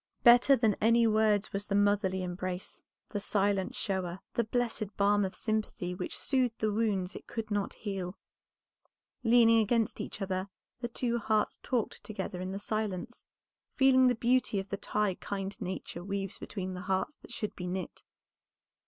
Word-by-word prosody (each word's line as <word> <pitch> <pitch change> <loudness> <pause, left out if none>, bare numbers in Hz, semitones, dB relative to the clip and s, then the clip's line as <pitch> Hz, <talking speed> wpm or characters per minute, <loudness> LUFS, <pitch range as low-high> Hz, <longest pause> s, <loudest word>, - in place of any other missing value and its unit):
Better 245 +3 +8
than 225 -4 +3
any 230 +2 +5
words 215 -2 +2
was 200 +1 -3
the 200 - 0
motherly 200 -2 +2
embrace, 180 +1 -4 0.3
the 205 - -2
silent 200 -1 0
shower, 185 -2 -2
the 235 - +2
blessed 225 -3 -2
balm 205 0 +4
of 190 - -2
sympathy 215 -5 -2
which 180 0 -4
soothed 255 -4 +1
the 215 -1 0
wounds 205 -4 0
it - - -9
could 225 -2 -5
not 205 -1 0
heal. 195 -3 -4 1.1
Leaning 230 -1 +6
against 225 0 +1
each - - -6
other 190 -1 -2 0.3
the 240 - -2
two 235 0 -1
hearts 215 -2 0
talked 245 -5 -2
together 190 -3 -5
in 185 +1 -3
the 195 - -3
silence, 215 +1 -3 0.5
feeling 260 -1 +6
the 250 - +3
beauty 240 -2 +2
of 195 +1 -6
the - - -1
tie 210 0 0
kind 200 +2 -4
Nature 180 -2 -5
weaves 195 0 -3
between 185 -3 -5
the 180 - -6
hearts 190 +10 -1
that - - -15
should 220 -3 -4
be 180 - -5
knit. 185 +1 -4
205 Hz, 165 wpm, -31 LUFS, 190-230 Hz, 1.1 s, Better